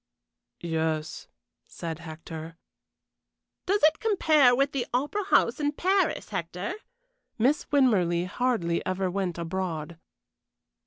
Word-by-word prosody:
"Yes," 160 -2 -2 0.4
said 165 -1 -6
Hector. 160 0 -8 1.1
"Does 400 0 +1
it 310 +1 +5
compare 310 - +4
with 275 +2 +2
the 255 -3 -2
Opera 295 +11 -1
House 235 -9 +3
in 290 0 0
Paris, 375 +2 +1
Hector?" 180 -1 -4 0.6
Miss 265 +7 +2
Winmarleigh 185 -11 +3
hardly 185 -5 0
ever 185 0 -1
went 185 -2 -2
abroad. 170 -2 -4
190 Hz, 105 wpm, -27 LUFS, 170-285 Hz, 1.1 s, it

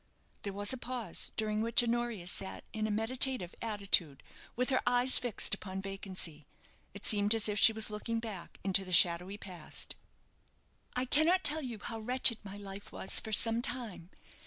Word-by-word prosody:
'" - - -38
There 200 - -5
was 205 +4 +2
a - - -5
pause, 240 -7 -3
during 215 -1 -2
which 230 +1 +2
Honoria 235 -5 -3
sat 190 +1 -4
in 215 0 -3
a - - -5
meditative 225 -2 +1
attitude, 200 -10 0 0.3
with 250 +3 -1
her 255 - +1
eyes 245 +1 +8
fixed 245 -4 0
upon 190 -1 -5
vacancy. 190 -6 -7 0.5
It 200 - -9
seemed 205 +1 +4
as 220 -1 +1
if 210 -1 -2
she 225 - +7
was 220 -1 -1
looking 220 +2 -4
back 215 -6 -9
into 195 0 +2
the 185 -1 -7
shadowy 180 +3 +2
past. 180 -6 -5 1.0
"I 250 +1 0
cannot 320 +8 +2
tell 310 +2 +4
you 245 -5 -7
how 225 +2 -6
wretched 240 0 +1
my 200 0 -9
life 200 0 -10
was - - +1
for 220 - -8
some 225 +2 +3
time. 235 -9 -5
215 Hz, 180 wpm, -31 LUFS, 195-240 Hz, 1.0 s, eyes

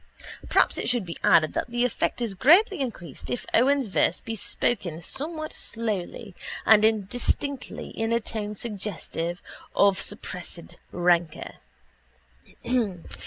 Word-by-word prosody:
Perhaps - - +3
it - - -1
should 240 -5 +1
be 170 - -5
added 155 -1 +5
that - - -2
the 240 +1 +1
effect 245 0 -1
is 230 -4 -1
greatly 345 - +5
increased 175 - -5
if 125 - -3
Owen's 275 +3 +4
verse 185 -3 +1
be 225 - -5
spoken 190 -6 -1
somewhat 310 - -4
slowly 210 -4 -3 0.3
and 215 -1 +7
indistinctly 235 +6 0
in 225 0 -2
a 230 - +3
tone 210 -2 -4
suggestive 195 -5 -4 0.3
of 200 -1 +4
suppressed 180 -4 -6
rancour. 175 -2 +1
215 Hz, 120 wpm, -26 LUFS, 180-245 Hz, 0.3 s, and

